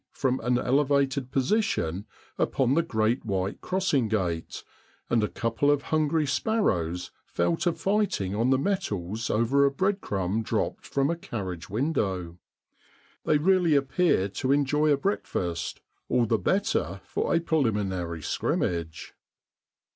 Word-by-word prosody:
' - - -63
from 130 -1 +2
an 125 +1 +1
elevated 140 0 +1
position 130 - 0 0.3
upon 130 -1 +2
the 165 - +4
great 115 -6 0
white 95 -2 -2
crossing 180 -10 +1
gate, 90 -7 -2 0.5
and 115 -2 +3
a - - +2
couple 115 +7 0
of 145 -1 +2
hungry 155 0 +2
sparrows 90 - 0 0.2
fell 170 - +1
to 175 +1 0
fighting 195 - 0
on 115 +4 +1
the 130 - +4
metals 115 - -2
over 115 +6 +3
a 140 - +5
breadcrumb 115 - -1
dropped 110 - -2
from 140 +2 +1
a - - -1
carriage 95 - -6
window; 95 - -1 0.9
they 150 - +4
really 175 0 +3
appear 135 - +2
to 130 +6 -2
enjoy 145 +2 +2
a 145 - +4
breakfast 90 - -2 0.3
all 120 -1 +3
the 115 -1 +1
better 95 - 0
for - - -2
a - - +4
preliminary 100 - -1
scrimmage. 85 +1 -2
125 Hz, 135 wpm, -27 LUFS, 100-155 Hz, 0.9 s, a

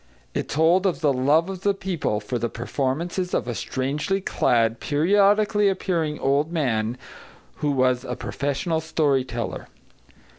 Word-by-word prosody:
It - - -3
told 170 +6 +3
of 175 -2 -2
the 145 -3 +3
love 145 +6 +3
of 190 -2 -6
the 200 0 +1
people 175 - -2
for 120 +3 -4
the 120 +1 -1
performances 145 - -2
of - - -1
a 120 - -2
strangely 145 - -2
clad, 115 - +1
periodically 205 +6 +3
appearing 170 -5 -1
old 140 +4 +1
man 120 -7 0 0.6
who 150 - -1
was 130 -2 +2
a 125 -1 -4
professional 145 +4 -2
story 150 -4 +1
teller. 120 -3 -5
150 Hz, 145 wpm, -24 LUFS, 130-180 Hz, 0.6 s, told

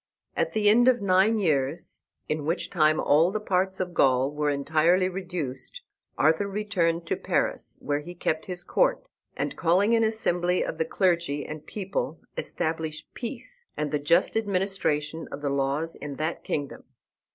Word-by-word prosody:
At - - 0
the 215 -1 +2
end 235 +4 +6
of 255 -1 +5
nine 200 +3 +3
years, 155 -4 -1 0.3
in 155 -1 -2
which 165 +5 -1
time 155 -3 +3
all 160 +4 +4
the 215 +3 -2
parts 190 -2 0
of 180 -1 -3
Gaul 130 -2 +3
were 150 0 0
entirely 160 +6 +2
reduced, 180 - -5 0.3
Arthur 160 +6 +3
returned 185 -5 0
to - - 0
Paris, - - -1
where 145 0 0
he 175 +4 -9
kept 160 -2 -1
his 180 -2 -4
court, - - +1 0.3
and, - - -2
calling 185 +6 +3
an 225 -1 +4
assembly 180 -5 +1
of 160 - -5
the 160 - +2
clergy 170 -5 0
and 155 0 -8
people, 195 -5 -3 0.2
established 160 -1 -3
peace 275 - -7
and 150 -1 -2
the 150 - 0
just 145 +4 +2
administration 185 -7 -1
of 140 - -6
the 140 - 0
laws 140 +4 -1
in 145 -1 -7
that 155 +4 -3
kingdom. 145 -2 -4
170 Hz, 165 wpm, -26 LUFS, 150-195 Hz, 0.3 s, end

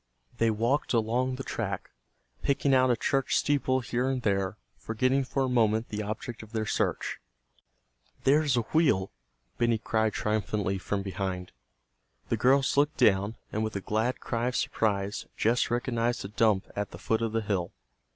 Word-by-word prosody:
They 115 - +4
walked 115 +8 0
along 120 +3 +1
the 135 - -6
track, 100 -7 -4 0.5
picking 140 0 +2
out 130 -1 +5
a 120 - +4
church 135 +4 0
steeple 130 -2 +1
here 125 +2 -1
and 130 -2 -2
there, 100 0 0 0.2
forgetting 130 +5 +1
for 135 +1 -1
a - - +1
moment 110 -2 +2
the 105 0 -3
object 110 +3 -5
of 110 0 -13
their 110 -1 -1
search. - - -1 1.0
"There's 145 -1 +3
a - - +3
wheel!" 135 - +3 0.5
Benny 115 -1 +3
cried 110 0 0
triumphantly 105 -2 -1
from 100 +1 -2
behind. 95 -2 -4 0.8
The - - +1
girls 135 +2 +3
looked 145 +2 +3
down, 100 +2 +3 0.2
and 110 - -1
with 110 -1 -3
a - - 0
glad 110 +6 -1
cry 120 0 -2
of 125 - -2
surprise 100 -2 -1
Jess 115 +3 +2
recognized 120 -2 0
a - - -5
dump 105 -2 +2
at 105 -1 -2
the - - -10
foot 110 +4 0
of 115 -1 0
the 115 0 0
hill. 100 -5 -1
115 Hz, 170 wpm, -28 LUFS, 105-130 Hz, 1.0 s, out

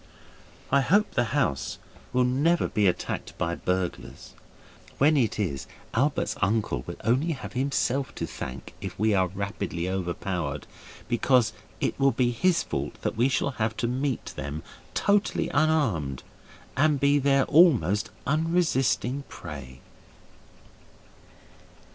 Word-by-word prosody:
I 140 +1 +5
hope 205 +9 +3
the 120 - +1
house 115 - -1 0.3
will 125 0 +3
never 145 +7 +2
be 105 -2 +2
attacked 90 - -2
by 85 0 -1
burglars. 90 +1 -3 0.6
When 150 +3 +4
it 125 -6 +1
is, 70 -11 -2 0.3
Albert's - - +1
uncle 100 - +1
will - - -5
only 130 +9 +2
have 135 - -8
himself 135 0 0
to - - -2
thank 65 -1 -7
if - - -6
we 110 +1 +2
are 95 -2 +3
rapidly 100 -2 -3
overpowered, 90 -5 -3 0.4
because 120 0 +3 0.3
it - - -1
will 135 0 +5
be 120 +1 +2
his 175 +8 +2
fault - - -4
that - - -1
we 120 +4 +3
shall 135 +1 0
have 110 0 0
to 120 - 0
meet 130 +1 -2
them 75 +3 -5 0.3
totally 205 0 +2
unarmed, 110 - +1 0.5
and 145 +1 +3
be 140 +1 +4
their 135 0 +3
almost 125 - +4 0.2
unresisting 140 -4 +1
prey. 65 -4 -9
120 Hz, 130 wpm, -27 LUFS, 90-140 Hz, 0.6 s, I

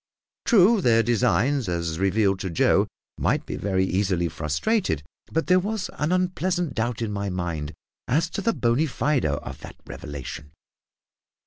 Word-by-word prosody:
True, 215 -1 +5
their 115 -5 +4
designs, 120 +2 +2
as 85 -2 -2
revealed 100 0 +2
to 95 - -3
Joe, 80 - +3 0.3
might - - +1
be - - -5
very 95 -1 0
easily 95 -3 0
frustrated; 80 - -1 0.3
but 160 - 0
there 185 0 +5
was 205 0 -3
an 150 +3 0
unpleasant 180 -3 0
doubt 120 +1 -1
in 110 - -2
my 100 -1 -2
mind 85 -5 -3 0.3
as 155 +6 +2
to - - -3
the 230 - +2
bona 120 +7 +1
fides 135 - 0
of 75 0 -4
that - - -10
revelation. 75 +1 -8
110 Hz, 150 wpm, -25 LUFS, -, 0.3 s, True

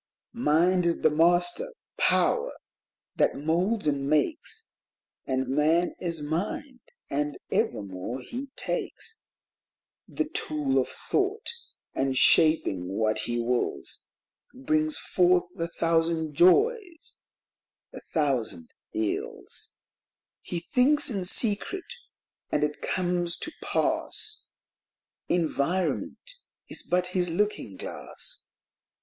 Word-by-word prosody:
Mind 180 -4 +3
is 170 - 0
the 155 - +5
Master 175 - +2 0.2
power 485 +1 +2 0.6
that - - +3
moulds 175 +8 0
and 140 -2 0
makes. 330 - 0 0.5
And 130 -1 0
Man 155 +6 +2
is 170 -4 -2
Mind 205 - -3 0.3
and 145 +1 -1
evermore 100 +3 -2
he 250 - -6
takes 450 - -3 0.9
The - - -2
Tool 300 -3 0
of - - -1
Thought, 410 +3 -1 0.4
and, 135 -1 0
shaping 100 - +5
what 110 -1 +2
he 120 +2 -1
wills, 120 +1 -2 0.5
Brings 310 +3 0
forth 180 -1 +3 0.2
a 165 - 0
thousand 165 -2 0
joys, 360 - +3 0.8
a - - -7
thousand 150 - -1 0.2
ills 425 +6 -2 0.3
:— - - -67
He 175 -2 -1
thinks 265 - +3
in 195 -4 -2
secret, 235 - +1 0.6
and 150 - +1
it 150 0 -2
comes 175 -2 0
to - - -3
pass; 430 - -1 0.8
Environment 175 - -1 0.4
is - - 0
but 180 0 0
his 180 -2 +2
looking 170 - -1
glass. - - -3
175 Hz, 105 wpm, -27 LUFS, -, 0.9 s, the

